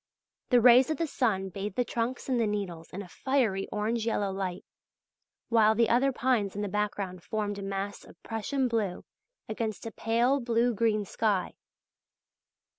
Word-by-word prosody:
The 245 -2 +5
rays 245 +3 +7
of 310 - -1
the 330 - 0
sun 210 -10 0
bathed 195 +1 -5
the 245 - +1
trunks 235 +2 -3
and 255 -3 +1
the 225 - +2
needles 190 -6 -4
in 200 +3 -6
a - - -12
fiery 225 -4 0
orange 220 +2 -1
yellow 205 -3 0
light, 190 -2 -4 0.8
while 220 -2 +5
the 230 0 +3
other 260 +3 +3
pines 240 -7 0
in 205 - -2
the - - -1
background 200 -2 -2
formed 205 -2 -3
a - - -6
mass 195 +1 -4
of - - -16
Prussian 255 +4 -1
blue 215 -6 -2 0.4
against 220 -1 -4
a 225 - -4
pale 235 +6 +1
blue 235 0 +1
green 215 -1 +1
sky. 205 -2 0
220 Hz, 170 wpm, -29 LUFS, 200-240 Hz, 0.8 s, rays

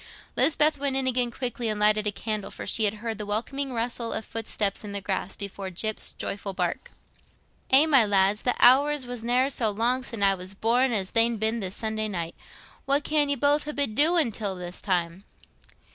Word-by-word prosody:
Lisbeth 305 -2 +4
went 280 -1 -1
in 265 -1 +1
again 250 -1 +1
quickly 240 -1 -3
and 210 -1 -1
lighted 210 0 +3
a - - 0
candle, 215 0 -4
for - - -8
she 220 - +2
had 205 +1 0
heard 225 -2 -4
the 210 - -4
welcome 265 +6 -3
rustling 235 -1 -3
of 220 - -6
footsteps 215 -3 -3
on 205 -1 -7
the 200 - -2
grass, 195 -1 -3
before 200 -1 -5
Gyp's 215 +4 -2
joyful 200 0 -4
bark. 180 -2 -3 0.8
"Eh, 270 +4 +7
my 275 -6 +5
lads! 200 0 +2
Th' 250 - 0
hours 280 +2 +5
war 245 0 -6
ne'er 250 +4 +1
so 230 -5 0
long 235 +5 0
sin' 230 -4 -4
I 195 0 +5
war 185 -1 -6
born 245 +3 +2
as 195 -4 0
they'n 230 0 +3
been 220 +2 -1
this 190 -3 -4
blessed - - -12
Sunday 220 -1 -2
night. 170 -5 -4 0.5
What 280 +1 +1
can 300 -2 +1
ye 285 - +2
both 290 +3 +1
ha' 300 - -6
been 280 -6 +1
doin' 310 0 +3
till 200 -2 -4
this 180 0 -7
time?" 180 -1 -2
225 Hz, 205 wpm, -25 LUFS, 200-260 Hz, 0.8 s, Eh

